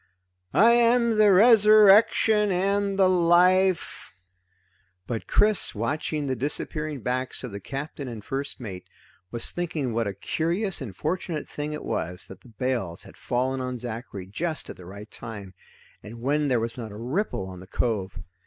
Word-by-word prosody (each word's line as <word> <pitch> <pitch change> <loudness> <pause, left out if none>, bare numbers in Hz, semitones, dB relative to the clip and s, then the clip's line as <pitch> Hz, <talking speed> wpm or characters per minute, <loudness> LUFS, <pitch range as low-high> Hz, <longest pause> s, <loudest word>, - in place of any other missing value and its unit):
"I 230 +3 +7
am 235 -1 +3
the 210 -1 +6
Resurrection 210 0 +6
and 195 +2 0
the 190 -1 +5
Life 180 - +2 0.5
" 95 0 -42
But 115 +3 -4
Chris, 210 - +2
watching 145 +6 -2
the 130 -1 -1
disappearing 150 +2 -3
backs 125 +3 -3
of 125 - -6
the 100 - -6
Captain 140 +5 -6
and 115 -4 -8
first 140 +2 -4
mate, 100 -7 -8 0.4
was 120 +3 -4
thinking 155 -8 -3
what 115 -1 0
a 100 - -4
curious 170 - -2
and 110 -9 -7
fortunate 160 - -3
thing 150 +1 -5
it 150 - -6
was 90 +2 -2
that 95 - -11
the - - -18
bales 115 -6 -3
had - - -14
fallen 130 +2 -1
on 125 0 -3
Zachary 115 -5 -6
just 155 - -3
at - - -10
the 90 - -12
right 100 +3 -10
time, 100 -5 -8 0.5
and 115 +2 -10
when 145 +4 0
there 125 -3 +2
was 115 +2 -4
not 110 -3 -6
a 105 - -9
ripple 125 - -2
on 95 -1 -9
the 95 - -12
cove. 100 -3 -2
135 Hz, 170 wpm, -25 LUFS, 110-185 Hz, 0.5 s, I